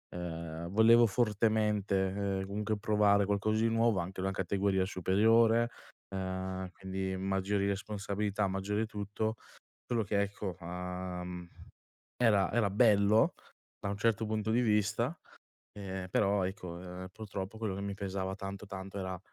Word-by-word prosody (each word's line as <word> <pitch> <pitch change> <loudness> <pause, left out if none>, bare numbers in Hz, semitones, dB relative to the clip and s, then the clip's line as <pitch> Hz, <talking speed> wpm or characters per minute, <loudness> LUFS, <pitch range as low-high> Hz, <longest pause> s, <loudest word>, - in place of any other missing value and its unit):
uhm, 85 -1 -5
volevo 115 +4 +6
fortemente, 105 -3 +2 0.3
ehm, 95 - -3
comunque 105 +2 -2
provare 105 -2 +3
qualcosa 105 +2 +1
di 115 - +3
nuovo 115 -2 +3
anche 95 +2 -4
una 95 +1 0
categoria 95 0 +1
superiore, 110 +5 +4 0.4
ehm 95 -1 -3
quindi 95 0 -4
maggiori 95 +1 0
responsabilità, 100 0 -1
maggiori 100 +3 -1
tutto, 105 +1 -3 0.6
solo 120 -2 +2
che 100 0 +1
ecco, 100 -2 -3
uhm, 90 0 -5 0.7
era 105 -5 +3
era 110 -2 +3
bello 105 0 +4 0.5
da - - -3
un 100 - -2
certo 110 +1 +1
punto 110 0 -1
di 115 +2 +3
vista, 110 - +1 0.6
ehm, 95 -2 -5
però 100 0 +2
ecco, 95 0 -4
uhm, 90 +1 -7
purtroppo 100 -1 -6
quello 110 -4 -2
che 100 - -4
mi 100 0 -3
pesava 95 -1 -3
tanto, 100 0 -6
tanto 95 0 -7
era 95 -1 -4
100 Hz, 135 wpm, -32 LUFS, 95-105 Hz, 0.7 s, volevo